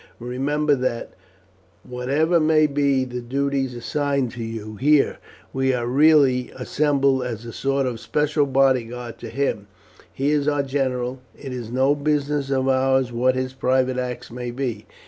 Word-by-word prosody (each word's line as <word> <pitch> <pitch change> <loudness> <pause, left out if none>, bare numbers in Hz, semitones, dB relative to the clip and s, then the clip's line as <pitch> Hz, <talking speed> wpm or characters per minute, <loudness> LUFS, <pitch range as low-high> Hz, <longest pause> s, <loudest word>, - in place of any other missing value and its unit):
Remember 140 +5 0
that, 125 -3 -2 0.7
whatever 140 +7 +1
may 155 0 +4
be 140 -2 +1
the 125 -1 -5
duties 135 +1 -1
assigned 140 0 -1
to 120 -2 -6
you 110 -1 -6
here, 145 +3 +3 0.3
we 130 -1 +1
are 120 -1 -2
really 135 -1 +4
assembled 140 0 +1
as 115 -2 -5
a 115 - -8
sort 135 0 0
of 120 -3 -3
special 150 +1 0
bodyguard 125 -3 0
to 115 - -7
him; 120 -7 -2 0.4
he 140 +2 0
is 145 -1 +1
our 145 -1 +1
general. 130 -2 -2 0.2
It 135 -3 -7
is 120 -3 -6
no 130 +3 +3
business 145 -1 -1
of 135 -1 0
ours 130 -1 +2
what 125 +2 +1
his 130 0 -2
private 130 -1 +1
acts 125 -2 -5
may 125 0 -5
be. 125 -1 -4
130 Hz, 155 wpm, -22 LUFS, 125-140 Hz, 0.7 s, may